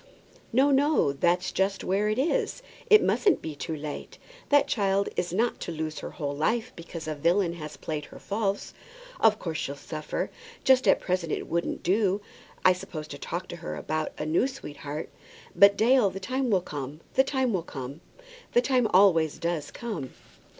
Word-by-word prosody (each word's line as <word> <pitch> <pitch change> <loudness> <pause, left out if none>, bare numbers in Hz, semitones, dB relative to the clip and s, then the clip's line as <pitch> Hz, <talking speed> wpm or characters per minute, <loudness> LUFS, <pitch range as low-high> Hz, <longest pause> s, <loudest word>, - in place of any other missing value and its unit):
"No, 270 +5 +4
no; 280 - +3
that's 175 +5 +1
just 195 +1 0
where 200 +3 +1
it 215 - 0
is. 330 - 0 0.3
It 430 0 +8
mustn't 400 - +3
be 160 - -5
too 160 +2 -4
late! 150 -1 -7 0.3
That 290 -1 +5
child 200 -2 +1
is 175 - -1
not 230 +6 0
to - - -5
lose 155 -1 -4
her - - -6
whole 145 -2 -4
life 220 +10 0
because 165 -1 -8
a 155 - -1
villain 170 +4 +2
has 155 -3 -8
played 150 -2 -4
her - - -13
false. 200 -1 -2 0.5
Of 215 -1 +5
course 160 -6 -4
she'll 140 - -3
suffer. 155 +1 -4 0.3
Just 260 -4 +5
at 190 - +5
present 180 -3 -1
it - - -2
wouldn't 170 0 -2
do, 195 +1 +2 0.5
I 185 - +8
suppose, 180 -5 -7
to - - -7
talk - - -4
to - - -6
her 75 - -5
about 155 - -2
a 150 - -3
new 165 +11 +2
sweetheart. 150 - -7 0.4
But, 200 0 +7
Dale, 240 -2 +5
the 190 - -6
time 255 +6 -1
will 195 -4 +3
come; 145 -2 -6
the 265 - +5
time 265 -3 0
will 185 - +1
come; 140 -1 -7 0.5
the 240 - +5
time 250 -3 +3
always 175 -5 +5
does 170 -3 -2
come." 205 - -5
185 Hz, 185 wpm, -27 LUFS, 155-220 Hz, 0.5 s, It